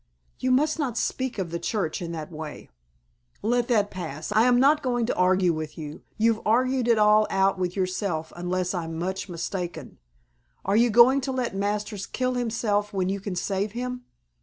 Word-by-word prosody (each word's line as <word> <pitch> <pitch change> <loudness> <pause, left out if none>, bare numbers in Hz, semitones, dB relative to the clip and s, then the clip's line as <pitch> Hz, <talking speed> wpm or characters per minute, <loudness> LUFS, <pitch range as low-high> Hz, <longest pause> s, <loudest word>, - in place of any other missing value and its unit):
"You 255 - 0
must 300 +5 +2
not 255 -6 -1
speak 260 0 -2
of 180 -4 -3
the 170 - -3
Church 185 -1 -2
in 170 -1 -4
that 160 0 -6
way." 155 - -8 0.7
"Let 240 +2 +1
that 210 -4 +2
pass. 160 -5 -6
I 220 +2 +4
am 245 -1 +4
not 295 +4 +4
going 245 -3 0
to - - -1
argue 180 -1 +3
with 155 -1 -5
you. 150 -2 -7 0.2
You've 225 0 +2
argued 255 +2 +2
it 235 -1 +4
all 210 0 +5
out 195 0 +2
with 180 -1 -1
yourself 185 -4 -2
unless 180 +1 -2
I'm 165 -3 -4
much 190 +3 -3
mistaken. 170 -3 -5 0.7
Are 195 - +1
you 235 +2 +5
going 240 +5 +6
to 265 +1 -2
let 250 -6 -2
Masters 205 0 -2
kill 255 0 -1
himself 220 -4 0
when 190 -2 -1
you 200 +1 -1
can 195 -1 -5
save 195 +3 -2
him? 250 +1 -4
205 Hz, 185 wpm, -26 LUFS, 180-240 Hz, 0.7 s, going